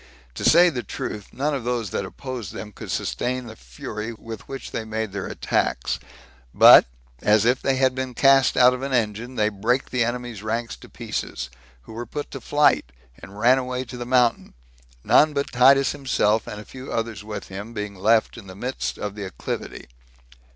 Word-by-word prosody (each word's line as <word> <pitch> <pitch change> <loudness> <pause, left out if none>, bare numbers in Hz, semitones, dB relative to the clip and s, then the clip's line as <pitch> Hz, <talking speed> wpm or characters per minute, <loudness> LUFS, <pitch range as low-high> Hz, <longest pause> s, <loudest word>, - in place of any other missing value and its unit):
To - - -6
say 175 +2 +6
the 125 -5 -3
truth, 105 -3 -6
none 145 +3 -1
of 135 -4 -3
those 120 -4 -2
that 100 - -2
opposed 130 -4 -7
them 105 - -7
could - - -10
sustain 125 0 -2
the 115 - -9
fury 60 - -7
with 115 0 -9
which 135 0 -7
they 115 - -3
made 110 -1 -3
their 100 -1 -4
attacks; - - -1 0.6
but, - - +9 0.3
as 105 +1 +4
if 125 +2 +2
they 135 - +1
had 130 0 +2
been 130 -1 -4
cast 135 0 +4
out 125 0 +7
of 125 - -5
an 135 0 -3
engine, 115 +1 -1
they 105 -2 +2
brake 115 +6 -1
the 125 -2 +2
enemies' 120 -3 -4
ranks 115 +1 -3
to - - -15
pieces, 65 - -5 0.3
who - - -12
were 120 +1 -6
put 145 +5 -6
to 135 - -7
flight, 145 - +2 0.3
and 95 +4 -12
ran 125 +4 +4
away 125 0 -3
to 125 - -9
the 120 -1 -6
mountain; 125 - +2 0.5
none 155 0 +5
but 140 0 -1
Titus 135 +3 +5
himself, 115 -6 0
and 105 - -6
a 105 - -10
few 130 +1 -9
others 115 -3 -3
with 105 0 -7
him, 100 +4 -7
being 105 -2 -5
left 110 +5 +2
in 100 - -13
the 95 - -10
midst 125 +6 -4
of 105 -1 -4
the 105 0 -7
acclivity. 95 - -6
120 Hz, 195 wpm, -23 LUFS, 105-130 Hz, 0.6 s, but